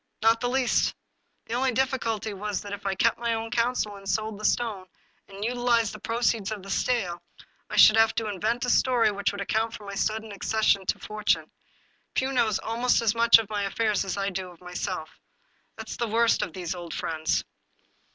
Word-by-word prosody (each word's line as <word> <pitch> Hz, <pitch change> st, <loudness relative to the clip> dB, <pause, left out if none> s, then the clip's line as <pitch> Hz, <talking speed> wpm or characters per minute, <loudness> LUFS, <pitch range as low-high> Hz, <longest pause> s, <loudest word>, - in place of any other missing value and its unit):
Not 225 Hz, +1 st, +5 dB
the 245 Hz, -, 0 dB
least! 260 Hz, -1 st, +1 dB, 0.5 s
The 225 Hz, -, -6 dB
only 255 Hz, +1 st, +1 dB
dif 265 Hz, +2 st, +2 dB
ficulty 225 Hz, -4 st, -2 dB
was 205 Hz, 0 st, -3 dB
that 205 Hz, 0 st, -7 dB
if 200 Hz, 0 st, -5 dB
I 195 Hz, -, 0 dB
kept 230 Hz, +4 st, +2 dB
my 235 Hz, -1 st, 0 dB
own 225 Hz, 0 st, -4 dB
counsel, 235 Hz, -3 st, 0 dB
and 195 Hz, 0 st, -8 dB
sold 215 Hz, +2 st, -1 dB
the 215 Hz, -, -5 dB
stone 210 Hz, -6 st, 0 dB, 0.4 s
and 200 Hz, +1 st, -6 dB
utilized 240 Hz, -2 st, +1 dB
the 215 Hz, -, -9 dB
proceeds 230 Hz, -2 st, 0 dB
of 210 Hz, -3 st, -5 dB
the 195 Hz, -, -7 dB
sale, 190 Hz, -9 st, 0 dB, 0.5 s
I -, -, -4 dB
should 215 Hz, -, +8 dB
have 225 Hz, 0 st, +4 dB
to 225 Hz, -, -1 dB
invent 215 Hz, +5 st, -1 dB
a -, -, -2 dB
story 245 Hz, -4 st, +3 dB
which 200 Hz, 0 st, -1 dB
would 200 Hz, -, -6 dB
account 220 Hz, +3 st, -1 dB
for 210 Hz, -, -11 dB
my 200 Hz, -, -6 dB
sudden 220 Hz, +2 st, -2 dB
ac 200 Hz, -, -10 dB
cession 210 Hz, -3 st, +2 dB
to -, -, +1 dB
fortune. 215 Hz, 0 st, -1 dB, 0.6 s
Pugh 265 Hz, +1 st, +1 dB
knows 225 Hz, -6 st, +2 dB
almost 235 Hz, +2 st, +1 dB
as 215 Hz, -2 st, +3 dB
much 235 Hz, 0 st, +7 dB
of 225 Hz, -2 st, -3 dB
my 205 Hz, -1 st, -1 dB
affairs 205 Hz, 0 st, 0 dB
as 195 Hz, -1 st, -4 dB
I 200 Hz, 0 st, -1 dB
do 180 Hz, -2 st, -6 dB
myself. 180 Hz, -3 st, -5 dB, 0.6 s
That -, -, -8 dB
is -, -, -5 dB
the 235 Hz, -, -1 dB
worst 230 Hz, +1 st, +3 dB
of 170 Hz, -, -3 dB
these 180 Hz, -1 st, -4 dB
old 175 Hz, -2 st, -7 dB
friends 160 Hz, -1 st, -1 dB
215 Hz, 210 wpm, -26 LUFS, 195-230 Hz, 0.6 s, should